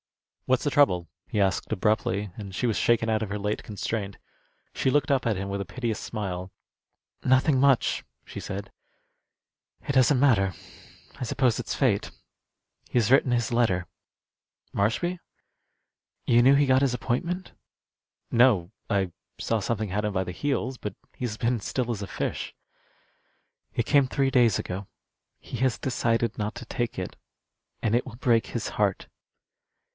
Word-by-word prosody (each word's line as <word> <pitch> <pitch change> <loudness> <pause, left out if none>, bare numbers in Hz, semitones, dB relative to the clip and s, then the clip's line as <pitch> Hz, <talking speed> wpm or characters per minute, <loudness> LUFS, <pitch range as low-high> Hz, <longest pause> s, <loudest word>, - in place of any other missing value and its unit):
"What's 130 -1 +2
the 145 - +1
trouble?" 90 -13 +3 0.2
he 105 - -1
asked, 95 +1 +1
abruptly, 105 -1 0
and 100 -3 -8
she 120 +6 0
was 110 - +1
shaken 115 -1 +2
out 110 -1 +1
of 105 - -4
her 105 - -2
late 105 +1 -2
constraint. 105 -1 -4 0.6
She - - +1
looked 145 +1 +2
up 130 -3 +2
at 110 -4 +1
him 100 +1 -3
with 100 0 -3
a - - -4
piteous 120 -2 -3
smile. 95 -4 -4 0.7
"Nothing 130 +2 +4
much," 135 -2 +3 0.2
she - - -7
said. 100 +1 -6 1.2
"It 140 - 0
doesn't 130 0 +4
matter. 105 -9 +4 0.6
I - - -5
suppose 125 -1 +1
it's - - -3
fate. 110 -7 +1 0.8
He - - -1
has 120 -1 +3
written 135 -1 +5
his 120 -1 +1
letter." 95 -7 +2 0.9
"Marshby?" 170 - 0 1.1
"You 120 0 +5
knew 135 +3 +6
he 145 +1 +4
got 130 0 +4
his 135 -3 +2
appointment?" 170 +10 -2 0.8
"No; 115 -8 +4 0.2
I 95 -4 +1 0.3
saw 115 - 0
something 110 0 -2
had 105 +3 -1
him 105 - 0
by 95 -1 0
the 90 - -4
heels, 130 +3 -2
but 105 -4 -5 0.2
he's 120 -4 -4
been 120 +1 +1
still 120 +3 -2
as 105 -3 -3
a 100 - -4
fish." 90 - -4 1.2
"It 115 - 0
came 140 -2 +4
three 135 0 +1
days 120 -5 +4
ago. 95 +2 -5 0.5
He - - -7
has 130 -1 +1
decided 115 -2 0
not 105 +1 -2
to - - -8
take 120 -6 -3
it. 90 - -5 0.7
And 110 +1 +1
it 120 - +1
will 120 -3 -9
break 120 -2 +2
his 115 - -3
heart." 100 -2 0
115 Hz, 160 wpm, -27 LUFS, 100-130 Hz, 1.2 s, knew